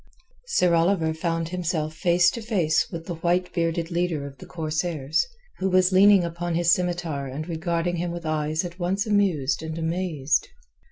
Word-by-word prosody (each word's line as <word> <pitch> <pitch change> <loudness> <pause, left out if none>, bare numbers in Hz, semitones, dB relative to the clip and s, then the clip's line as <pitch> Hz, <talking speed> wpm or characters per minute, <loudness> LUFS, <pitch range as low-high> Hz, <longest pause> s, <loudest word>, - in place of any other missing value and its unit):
Sir 180 - +2
Oliver 165 -1 +2
found 165 0 -2
himself 165 -3 -2
face 175 +1 +3
to 230 - -6
face 180 -8 +1
with 165 -2 -7
the 175 - -4
white 180 +2 0
bearded 165 0 -1
leader 170 -4 -1
of 135 -2 -10
the - - -11
corsairs, 155 -2 -1 0.3
who 190 - 0
was 185 0 +4
leaning 195 0 +6
upon 170 0 -3
his 170 0 +3
scimitar 175 -6 -1
and 145 +5 -5
regarding 170 +1 -1
him 175 +1 -2
with 170 -1 -6
eyes 155 +2 -1
at 175 +1 -8
once 190 +4 0
amused 195 -10 +1
and 160 0 -5
amazed. 160 -3 0
170 Hz, 170 wpm, -25 LUFS, 160-180 Hz, 0.3 s, leaning